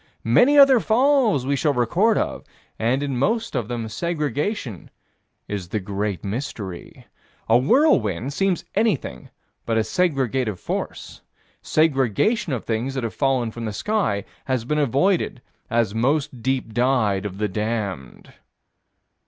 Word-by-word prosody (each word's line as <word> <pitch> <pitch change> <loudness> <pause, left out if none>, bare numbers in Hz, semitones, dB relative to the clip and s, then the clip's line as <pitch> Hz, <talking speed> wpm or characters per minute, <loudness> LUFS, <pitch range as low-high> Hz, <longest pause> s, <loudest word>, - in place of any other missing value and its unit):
Many 245 - +5
other 275 -3 +8
falls 230 - +2
we 140 +1 +1
shall 145 +1 +1
have - - -7
record 180 - +2
of, - - -2 0.4
and 125 +5 +1
in 135 -3 -2
most 225 - 0
of 120 -5 -1
them 120 -2 -4
segregation 150 - -3 0.6
is 95 -4 -5
the 110 - -1
great 100 -2 -3
mystery. 100 -4 -6 0.4
A 110 - +4
whirlwind 135 - +2
seems 195 -1 0
anything 190 - -1 0.3
but 115 -1 -1
a - - +4
segregative 130 - 0
force. - - -5 0.4
Segregation 155 - +1
of 125 - -3
things 120 +4 -2
that 130 - -2
have 115 - -3
fallen 130 -5 0
from 115 +1 -6
the 110 - -3
sky 110 - -1 0.2
has 130 -4 -1
been 150 +4 0
avoided 145 - +1 0.3
as 115 -3 +1
most 130 +2 0
deep 130 -3 -1
dyed 120 -5 +1
of 100 -2 -5
the 105 +1 0
damned. 105 - -4
125 Hz, 140 wpm, -22 LUFS, 110-160 Hz, 0.6 s, other